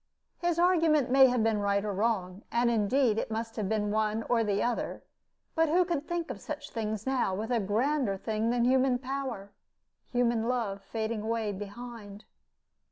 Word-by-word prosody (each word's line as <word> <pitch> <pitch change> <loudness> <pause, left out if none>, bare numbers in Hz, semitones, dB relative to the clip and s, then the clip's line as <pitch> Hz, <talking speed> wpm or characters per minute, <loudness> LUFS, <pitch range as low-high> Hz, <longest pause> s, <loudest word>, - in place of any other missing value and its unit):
His 345 -1 0
argument 325 -7 +3
may 265 0 +8
have 245 -3 +1
been 220 -2 +2
right 200 0 +1
or 205 - -2
wrong 195 -3 -1
and, 235 0 +2
indeed, 230 +1 +2
it - - -3
must 225 0 -4
have 210 -4 -2
been 210 -1 0
one 215 +1 0
or 230 -1 +1
the 205 -2 0
other 240 -1 -2 0.5
but 325 -1 +2
who 355 +3 +4
could 320 -4 -2
think 345 -1 -2
of - - -8
such - - -6
things 220 -3 -3
now, 260 -8 0
with 220 +5 -4
a 240 - +2
grander 225 +2 0
thing 220 +2 -1
than 240 0 +2
human 260 0 +3
power 255 -6 -5 0.6
human 235 -2 +1
love 220 -6 -1
fading 220 0 -3
away 220 -1 -1
behind? 205 +1 -8
230 Hz, 175 wpm, -29 LUFS, 210-260 Hz, 0.6 s, may